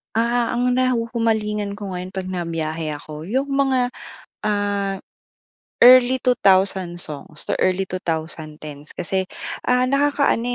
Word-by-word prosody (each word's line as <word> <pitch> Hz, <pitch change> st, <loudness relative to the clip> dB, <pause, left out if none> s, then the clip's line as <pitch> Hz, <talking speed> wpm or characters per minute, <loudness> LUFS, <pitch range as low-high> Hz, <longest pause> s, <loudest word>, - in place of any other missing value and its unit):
Ah, 235 Hz, +1 st, +1 dB
ang 250 Hz, 0 st, +2 dB
nahuhumalingan 230 Hz, -4 st, 0 dB
ko 195 Hz, -3 st, -5 dB
ngayon 180 Hz, +1 st, -6 dB
pag 190 Hz, -1 st, -5 dB
nabiyahe 165 Hz, -3 st, -3 dB
ako, 150 Hz, +1 st, -9 dB
yung 260 Hz, -, -1 dB
mga 270 Hz, -2 st, +2 dB, 0.5 s
ah 205 Hz, -1 st, -1 dB, 0.8 s
early 255 Hz, +1 st, +7 dB
2000 190 Hz, -7 st, +2 dB
songs 150 Hz, -2 st, -4 dB
to -, -, -1 dB
early 185 Hz, +1 st, +2 dB
2010's. 160 Hz, -4 st, -5 dB
Kasi 185 Hz, +5 st, -3 dB, 0.4 s
ah, 250 Hz, 0 st, +4 dB
nakakaano 280 Hz, -1 st, +2 dB
200 Hz, 115 wpm, -21 LUFS, 175-245 Hz, 0.8 s, early